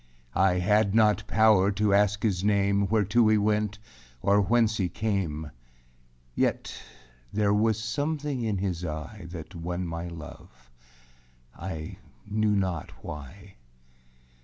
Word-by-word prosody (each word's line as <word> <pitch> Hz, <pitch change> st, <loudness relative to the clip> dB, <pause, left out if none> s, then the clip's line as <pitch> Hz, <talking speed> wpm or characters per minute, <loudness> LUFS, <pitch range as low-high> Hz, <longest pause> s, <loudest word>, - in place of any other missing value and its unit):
I 95 Hz, 0 st, +3 dB
had 100 Hz, +3 st, +2 dB
not 105 Hz, -1 st, +3 dB
powâr 105 Hz, -3 st, +4 dB
to 105 Hz, 0 st, +2 dB
ask 105 Hz, 0 st, +2 dB
his 95 Hz, -5 st, 0 dB
name, 100 Hz, -1 st, +2 dB
Whereto 110 Hz, +2 st, +3 dB
he 110 Hz, 0 st, +4 dB
went, 105 Hz, 0 st, 0 dB, 0.5 s
or 100 Hz, +1 st, +4 dB
whence 110 Hz, +1 st, +2 dB
he 95 Hz, -3 st, 0 dB
came; 85 Hz, -7 st, -2 dB, 0.8 s
Yet -, -, -1 dB, 0.6 s
there 105 Hz, -1 st, +2 dB
was 110 Hz, +1 st, +2 dB
something 145 Hz, +4 st, -2 dB
in 110 Hz, -3 st, -1 dB
his 90 Hz, -2 st, -2 dB
eye 85 Hz, +4 st, -6 dB
That 85 Hz, +1 st, -8 dB
won 90 Hz, +1 st, -4 dB
my 85 Hz, +1 st, -4 dB
love; 75 Hz, -7 st, -12 dB, 0.8 s
I 80 Hz, -2 st, -6 dB, 0.3 s
knew 105 Hz, 0 st, +1 dB
not 95 Hz, -6 st, -1 dB
why. 90 Hz, +7 st, -9 dB
100 Hz, 125 wpm, -27 LUFS, 90-105 Hz, 0.8 s, powâr